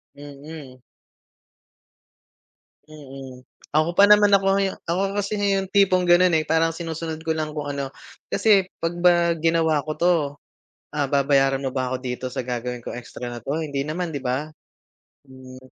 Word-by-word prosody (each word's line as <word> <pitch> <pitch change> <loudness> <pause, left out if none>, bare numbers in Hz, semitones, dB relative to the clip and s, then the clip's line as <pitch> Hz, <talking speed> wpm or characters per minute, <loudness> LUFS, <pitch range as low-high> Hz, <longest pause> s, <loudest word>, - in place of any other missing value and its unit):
Mm. 145 -1 -11 2.1
Mm. 135 -4 -11 0.3
Ako 155 +3 +1
pa 200 - +7
naman 210 0 +6
ako 195 0 +1 0.2
yung 195 -1 -1
ako 195 +4 -1
kasi 200 +1 -2 0.2
yung 195 - -1
tipong 185 -3 +3
ganun, 175 +1 +5
eh, 155 - 0
parang 160 +1 +2
sinusunod 165 -1 -5
ko 160 - 0
lang 155 -1 -4
kung 145 -1 -3
ano. 140 -1 -4 0.4
Kasi, 200 -4 +3 0.2
"'Pag 165 +1 0
ba 175 -1 +4
ginawa 160 -2 +2
ko - - -1
'to, 180 +1 +3 0.8
ah, 140 -2 0
babayaran 135 -1 +3
mo 130 - -3
ba 130 -1 -1
ako 130 - -1
dito 125 0 -5
sa - - -5
gagawin 125 0 -4
kong 120 - -7
extra 125 - -9
na 120 -1 -7
'to, 145 +3 -2
hindi 140 -3 -3
naman, 160 +3 -4
'di 140 - -4
ba?" 130 +4 -2 0.8
Mm. 130 0 -13
155 Hz, 160 wpm, -23 LUFS, 135-175 Hz, 2.1 s, pa